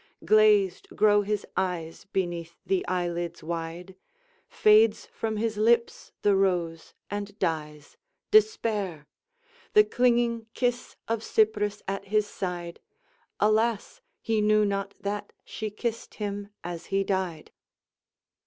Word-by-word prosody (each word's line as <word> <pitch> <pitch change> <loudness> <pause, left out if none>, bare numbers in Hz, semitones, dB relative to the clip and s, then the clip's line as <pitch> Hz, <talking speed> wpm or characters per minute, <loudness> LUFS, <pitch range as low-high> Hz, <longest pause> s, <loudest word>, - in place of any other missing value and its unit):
Glazed 210 -1 +4
grow 205 -1 +5
his 205 0 -2
eyes 175 -2 -3
beneath 175 -4 -3
the 190 -2 +1
eyelids 175 -2 -2
wide; 170 +3 -5 0.5
Fades 215 0 +4
from 220 -1 -4
his 220 0 -1
lips 235 +2 +2
the 205 -1 +4
rose, 175 -4 0 0.2
and 205 0 -5
dies 150 -5 -3 0.3
Despair! 215 - +2 0.7
The 425 - +8
clinging 235 - +1
kiss 245 -1 -1
of 225 -1 -1
Cypris 210 -2 +1
at 195 +1 -3
his 210 +1 +1
side 175 -4 -5 0.6
Alas, 220 - +1 0.2
he 220 -1 +1
knew 215 0 +4
not 200 0 -2
that 205 +1 -4
she 215 -1 -5
kissed 230 +2 -4
him 205 -1 -4
as 170 -1 -6
he 195 0 +1
died! 185 -5 -2
205 Hz, 115 wpm, -27 LUFS, 180-215 Hz, 0.7 s, The